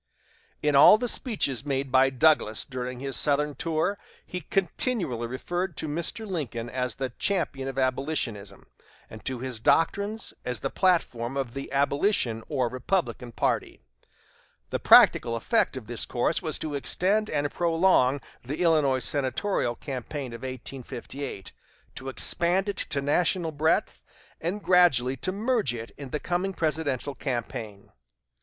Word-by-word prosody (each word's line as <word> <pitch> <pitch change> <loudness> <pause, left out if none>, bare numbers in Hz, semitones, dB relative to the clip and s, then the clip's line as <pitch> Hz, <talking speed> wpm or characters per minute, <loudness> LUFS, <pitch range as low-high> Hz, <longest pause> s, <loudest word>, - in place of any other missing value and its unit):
In 150 -1 +2
all 145 +9 +9
the 245 +2 -2
speeches 200 - 0
made 135 -2 -2
by 130 +1 +5
Douglas 135 -5 +2
during 125 -1 -5
his 135 -1 -3
Southern 150 0 +1
tour, 165 +7 -1 0.3
he 180 - -5
continually 175 - 0
referred 175 +7 -3
to - - -3
Mr. 170 +8 -3
Lincoln 125 - -4
as 125 -2 -2
the 130 -2 -3
champion 150 -9 0
of 135 0 -5
abolitionism, 130 -7 -2 0.5
and 110 - -10
to 130 -2 -2
his 130 -3 -3
doctrines 200 - +1
as 125 -1 -3
the 135 - -2
platform 140 -9 +1
of 130 -4 -2
the 135 -1 -6
abolition 140 - +1
or 130 -5 +1
Republican 130 0 -2
party. - - -1 0.9
The - - -1
practical 115 -1 +6
effect 220 - +1
of 125 - -7
this 120 0 -3
course 125 +6 0
was 160 -4 -1
to 155 -2 -4
extend 195 +9 +1
and 145 -1 -1
prolong 165 -6 +3 0.2
the 145 +6 -5
Illinois 145 -6 +3
senatorial 135 -1 -1
campaign 135 -1 -6
of 115 - -8
1858, 130 -3 -7 0.4
to 135 +1 -6
expand 175 +8 +2
it 200 - -3
to 140 -1 -2
national 165 +3 +1
breadth, 155 +2 0 0.4
and 185 +6 -3
gradually 145 -9 +4
to 185 - -2
merge 215 - 0
it 115 0 -7
in 140 -2 -8
the 150 - -2
coming 180 +4 -1
presidential 150 -5 -1
campaign. 115 -7 -5
140 Hz, 145 wpm, -27 LUFS, 125-175 Hz, 0.9 s, all